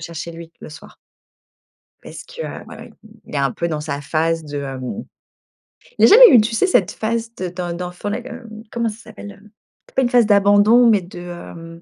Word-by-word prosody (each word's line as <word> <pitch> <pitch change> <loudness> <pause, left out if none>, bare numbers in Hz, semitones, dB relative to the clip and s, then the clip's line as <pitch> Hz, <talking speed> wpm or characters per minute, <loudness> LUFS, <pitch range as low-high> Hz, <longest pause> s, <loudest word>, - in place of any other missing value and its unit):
chercher 170 0 -7
lui 165 0 -11
le - - -10
soir. 150 - -14 1.1
Parce - - -10
que, - - -10
heu, - - -7
ouais, - - -11
ouais, - - -12 0.4
il - - -9
est - - 0
un 135 -2 0
peu 170 - -3
dans 155 -2 -3
sa 145 -2 -5
phase 165 +2 -1
de, 145 -1 -5
hem 135 - -6 0.9
Il - - +7
a - - +7
jamais 480 +3 +9
eu, 245 - +8
tu 225 +2 -2
sais, 300 - +2
cette 230 - +2
phase 230 +1 -3
de 185 - -3
d’en 175 -1 -5
d’enfant 180 +3 -6
là 240 - -3
comme, 255 -1 -9
heu, 245 -1 -12 0.2
comment 235 -1 -1
ça 215 - -9
s'appelle, 220 -2 -11
hem? 210 +1 -18 0.4
C’est - - -30
pas 265 - +2
une 240 - +1
phase 245 -2 +4
d'abandon, 205 +3 +5
mais 210 -4 +3
de, 175 0 -11
hem 170 -1 -10
195 Hz, 225 wpm, -19 LUFS, 165-230 Hz, 1.1 s, jamais